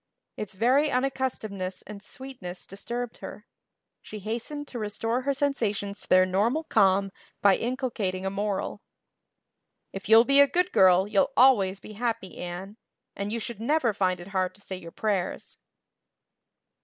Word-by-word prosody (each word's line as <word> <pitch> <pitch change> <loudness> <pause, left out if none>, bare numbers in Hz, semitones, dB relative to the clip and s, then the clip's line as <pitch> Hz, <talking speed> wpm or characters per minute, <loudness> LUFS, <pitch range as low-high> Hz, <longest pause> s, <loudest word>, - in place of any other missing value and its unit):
Its 200 -2 -6
very 260 +9 +3
unaccustomedness 250 -8 -2
and 210 -1 -9
sweetness 210 -7 -8
disturbed 235 +5 -5
her. 210 - -9 0.6
She 215 - -9
hastened 235 +8 -5
to 245 - -6
restore 225 +3 -1
her 280 +2 0
sensations 210 -8 -1
to - - -9
their 185 0 +6
normal 215 - +1
calm 195 -6 +3 0.3
by 200 -2 +5
inculcating 230 -7 -2
a 190 - -1
moral. 200 +1 -2 1.1
"If 195 +1 -7
you'll 225 +1 +8
be 275 +2 +4
a 280 - +8
good 360 +4 +1
girl 185 0 +5
you'll 205 -2 +2
always 200 -7 +5
be 215 - -11
happy, 225 -4 -3
Anne. 180 +4 -6 0.4
And 200 +1 -3
you 230 - -1
should 225 -1 -6
never 250 -2 +2
find 185 -2 0
it 175 +2 -9
hard 185 -2 -1
to 205 - -16
say 190 - -6
your 175 -2 -9
prayers." 195 -3 -2
210 Hz, 155 wpm, -27 LUFS, 190-245 Hz, 1.1 s, you'll